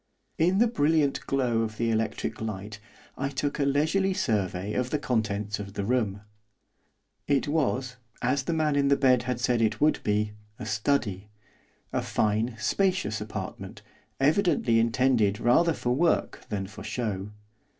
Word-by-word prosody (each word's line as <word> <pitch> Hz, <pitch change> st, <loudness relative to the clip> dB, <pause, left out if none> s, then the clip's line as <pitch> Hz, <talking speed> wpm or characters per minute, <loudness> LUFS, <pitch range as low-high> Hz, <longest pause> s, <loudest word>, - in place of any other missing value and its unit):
In 180 Hz, +4 st, +3 dB
the 230 Hz, -, +5 dB
brilliant 155 Hz, -, +2 dB
glow 125 Hz, -4 st, +1 dB
of 110 Hz, -1 st, -3 dB
the 115 Hz, -1 st, 0 dB
electric 110 Hz, -1 st, -2 dB
light 105 Hz, -1 st, -5 dB, 0.4 s
I 135 Hz, +1 st, 0 dB
took 140 Hz, +1 st, -2 dB
a 140 Hz, -, +2 dB
leisurely 160 Hz, +8 st, +1 dB
survey 105 Hz, -, -1 dB
of 125 Hz, 0 st, -1 dB
the 150 Hz, -, 0 dB
contents 105 Hz, -6 st, -1 dB
of 100 Hz, -1 st, -7 dB
the 100 Hz, -1 st, -3 dB
room. 105 Hz, -4 st, 0 dB, 1.1 s
It 140 Hz, -1 st, +2 dB
was, 135 Hz, -4 st, 0 dB, 0.2 s
as 130 Hz, +3 st, +1 dB
the 170 Hz, -, 0 dB
man 155 Hz, -2 st, +1 dB
in 140 Hz, -1 st, +3 dB
the 140 Hz, 0 st, +4 dB
bed 130 Hz, -3 st, +4 dB
had 125 Hz, -2 st, -1 dB
said 120 Hz, -1 st, +1 dB
it 110 Hz, -1 st, +1 dB
would 150 Hz, +1 st, +3 dB
be, 105 Hz, 0 st, +1 dB, 0.3 s
a 125 Hz, -, -7 dB
study, 105 Hz, -3 st, -1 dB, 0.6 s
a -, -, +1 dB
fine, 110 Hz, +3 st, 0 dB
spacious 110 Hz, -, 0 dB
apartment, 105 Hz, -, -7 dB, 0.4 s
evidently 145 Hz, -, +3 dB
intended 115 Hz, -3 st, +2 dB
rather 165 Hz, +8 st, +4 dB
for 120 Hz, -5 st, -2 dB
work 165 Hz, +6 st, 0 dB
than 100 Hz, -2 st, -2 dB
for 105 Hz, +2 st, -10 dB
show. 105 Hz, -3 st, -3 dB
120 Hz, 155 wpm, -27 LUFS, 105-145 Hz, 1.1 s, the